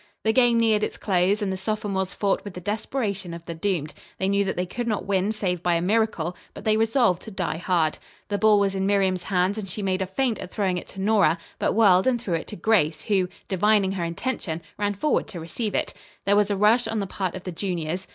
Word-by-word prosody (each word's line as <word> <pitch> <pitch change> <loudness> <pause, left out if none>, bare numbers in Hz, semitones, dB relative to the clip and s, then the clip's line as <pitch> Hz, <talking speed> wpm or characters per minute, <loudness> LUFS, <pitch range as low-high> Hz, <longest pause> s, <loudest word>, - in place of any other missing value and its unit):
The 220 - +2
game 240 -1 +4
neared 220 -2 +3
its - - -2
close 195 +2 +1
and 190 -2 -1
the - - -3
sophomores 195 -1 -2
fought 200 -2 0
with 200 -3 -8
the - - -5
desperation 205 -2 -3
of 170 0 -10
the 170 - -5
doomed. 165 -3 -2 0.2
They 190 - 0
knew 200 +1 +2
that 190 - -2
they 180 - -1
could 235 +6 -4
not 215 -2 -1
win 200 +1 +1
save 185 -5 -2
by 175 -1 +2
a 165 - +1
miracle, 190 -4 +1 0.2
but - - -9
they 215 -1 +3
resolved 225 -4 +2
to - - -9
die 185 -5 -2
hard. 170 -3 0 0.3
The 205 -1 -1
ball 215 0 +5
was 200 -1 +1
in 190 0 -1
Miriam's 190 -3 +1
hands 190 +2 +1
and 195 -3 -6
she 205 +3 -4
made 190 -1 0
a 190 - -1
feint 230 +4 0
at 185 - -6
throwing 185 -3 0
it - - -12
to 195 - -11
Nora, 200 -5 +3 0.2
but - - +1
whirled 195 -2 +5
and 250 -2 +2
threw 210 -7 -3
it 165 - -2
to - - -7
Grace, 185 -9 +2
who, 190 -4 +1 0.2
divining 200 0 +3
her 190 -3 -2
intention, 170 -2 -3
ran 205 0 -1
forward 295 +10 0
to 175 - -7
receive 205 +7 -3
it. - - -1 0.3
There 200 - +4
was 205 0 +3
a 200 - 0
rush 225 +4 +4
on 220 0 -2
the 200 - -1
part 185 -1 -3
of 185 - -7
the 180 - -5
juniors. 175 0 -3
195 Hz, 245 wpm, -25 LUFS, 180-215 Hz, 0.3 s, ball